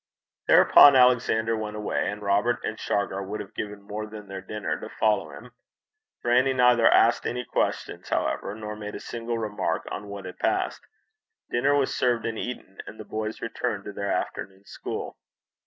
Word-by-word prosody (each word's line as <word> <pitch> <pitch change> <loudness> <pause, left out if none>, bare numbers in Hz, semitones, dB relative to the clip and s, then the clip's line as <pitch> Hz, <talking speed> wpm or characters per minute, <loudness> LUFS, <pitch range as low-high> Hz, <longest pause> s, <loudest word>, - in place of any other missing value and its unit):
Thereupon 140 -1 +8
Alexander 120 -3 +4
went 105 -1 -4
away, 105 -1 -1
and 105 0 -6
Robert 100 +4 +2
and 110 - -4
Shargar 100 -1 -1
would 100 +2 -5
have 100 - -8
given 105 -1 -6
more 105 +1 -5
than 105 -1 -10
their 95 -1 -6
dinner 105 +2 -4
to - - -8
follow 105 -7 +1
him. 70 - -12 0.7
Grannie 125 +3 +3
neither 125 -2 +5
asked - - +4
any 125 +1 -3
questions, - - -2
however, 100 +10 -1
nor 105 -1 -6
made 105 -1 -7
a - - -5
single 115 0 -4
remark 110 -2 -2
on 105 - -5
what 100 -1 -7
had 90 - -9
passed. - - 0 0.7
Dinner 140 +4 +2
was 140 -2 +1
served 120 -3 +1
and 115 -1 -3
eaten, 120 -6 -6
and 110 - -10
the - - -8
boys 110 0 -4
returned 115 -3 -3
to 100 - -7
their 100 0 -3
afternoon 95 0 -4
school. - - -6
110 Hz, 175 wpm, -26 LUFS, 100-120 Hz, 0.7 s, Thereupon